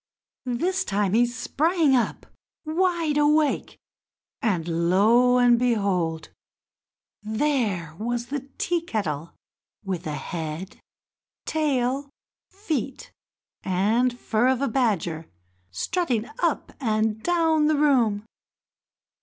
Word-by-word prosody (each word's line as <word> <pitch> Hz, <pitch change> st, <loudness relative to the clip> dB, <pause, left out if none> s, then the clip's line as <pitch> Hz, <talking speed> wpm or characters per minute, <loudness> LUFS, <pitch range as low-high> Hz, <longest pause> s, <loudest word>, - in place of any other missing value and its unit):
This 360 Hz, +11 st, 0 dB
time 200 Hz, -, 0 dB
he 240 Hz, +2 st, +4 dB
sprang 290 Hz, +5 st, +1 dB
up, 240 Hz, -, -1 dB, 0.4 s
wide 330 Hz, -2 st, +1 dB
awake, 300 Hz, 0 st, +2 dB, 0.6 s
and 170 Hz, -, 0 dB
lo 235 Hz, +7 st, +4 dB
and 245 Hz, -1 st, +5 dB
behold! 195 Hz, -9 st, 0 dB, 0.9 s
there 215 Hz, -, -1 dB
was 240 Hz, +2 st, -2 dB
the 275 Hz, +1 st, -5 dB
Tea 345 Hz, -1 st, 0 dB
kettle, 170 Hz, -, -4 dB, 0.5 s
with 185 Hz, -2 st, -3 dB
the 150 Hz, -, -3 dB
head, 160 Hz, +5 st, -5 dB, 0.7 s
tail, 280 Hz, -3 st, 0 dB, 0.4 s
feet, 315 Hz, -, -4 dB, 0.5 s
and 220 Hz, +7 st, +1 dB
fur 225 Hz, +3 st, +1 dB
of 260 Hz, -1 st, +2 dB
a -, -, +2 dB
badger 190 Hz, -10 st, -1 dB, 0.4 s
strutting 240 Hz, -, -1 dB
up -, -, 0 dB
and 220 Hz, -2 st, 0 dB
down 325 Hz, -2 st, +2 dB
the 310 Hz, -1 st, +2 dB
room! 240 Hz, -8 st, +2 dB
240 Hz, 100 wpm, -25 LUFS, 200-295 Hz, 0.9 s, and